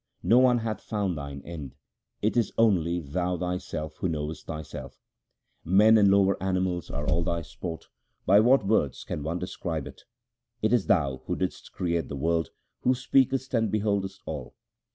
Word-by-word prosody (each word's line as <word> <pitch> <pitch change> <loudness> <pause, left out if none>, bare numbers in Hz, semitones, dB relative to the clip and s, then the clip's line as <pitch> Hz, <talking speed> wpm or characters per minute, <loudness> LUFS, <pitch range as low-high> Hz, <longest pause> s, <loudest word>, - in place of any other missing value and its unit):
No 120 - +5
one 125 -1 +5
hath 110 -2 -3
found 100 -5 -2
Thine 70 -2 -7
end; 75 -6 -7 0.5
it 110 - +1
is 115 -4 +2
only 90 -6 +3
Thou 90 +4 -2
Thyself 85 -4 -4
who 95 - -1
knowest 75 0 -4
Thyself. 80 -2 -7 0.6
Men 105 +5 +6
and 105 -2 +6
lower 100 -1 +3
animals 95 -2 -1
are 75 +1 -4
all 80 +5 +2
Thy 85 0 -1
sport; 80 +1 -7 0.4
by 100 +3 +6
what 120 0 +4
words 95 - +1
can - - -4
any 75 - -7
one 85 +2 -1
describe 85 -4 -4
it? 70 - -12 0.5
It 110 +2 +1
is 120 -6 +2
Thou, 70 -8 +2
who - - 0
didst 95 - -4
create 85 -2 -1
the 70 - -5
world, 80 +3 0 0.3
who 130 - +2
speakest 130 +1 +1
and 115 -3 +2
beholdest 100 -2 -1
all. 75 -5 -6
90 Hz, 175 wpm, -27 LUFS, 80-105 Hz, 0.6 s, Men